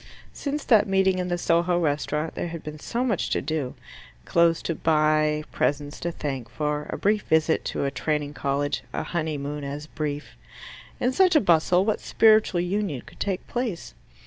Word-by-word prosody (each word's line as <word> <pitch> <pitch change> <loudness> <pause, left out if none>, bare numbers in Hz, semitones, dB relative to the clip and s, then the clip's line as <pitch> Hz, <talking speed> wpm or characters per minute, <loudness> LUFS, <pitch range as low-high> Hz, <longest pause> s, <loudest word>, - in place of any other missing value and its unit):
Since 290 +1 -3
that 220 -5 +4
meeting 190 -1 +2
in 180 - -1
the 175 -1 -1
Soho 175 +1 +2
restaurant 150 0 -1
there - - -3
had 165 -1 -7
been 150 0 -7
so 240 +9 -2
much 225 -8 0
to - - +1
do 145 -3 -3 0.5
clothes 170 -1 +3
to 165 - -1
buy, 155 -1 +2
presents 145 0 -1
to 170 - -2
thank 135 -7 -4
for, 150 0 -2
a - - -3
brief 210 +1 +2
visit 160 -1 +2
to - - -2
a 140 - 0
Training 150 -1 -2
College, 140 0 -1
a - - -2
honeymoon 150 -3 -3
as 145 +2 -5
brief. 150 -1 -5 0.6
In 250 - +1
such 370 +2 +4
a - - +8
bustle, 180 - +3
what 215 -1 +1
spiritual 215 -5 +4
union 180 -7 -2
could 155 - -17
take 195 -3 -2
place? 240 -8 -4
160 Hz, 175 wpm, -25 LUFS, 150-190 Hz, 0.6 s, a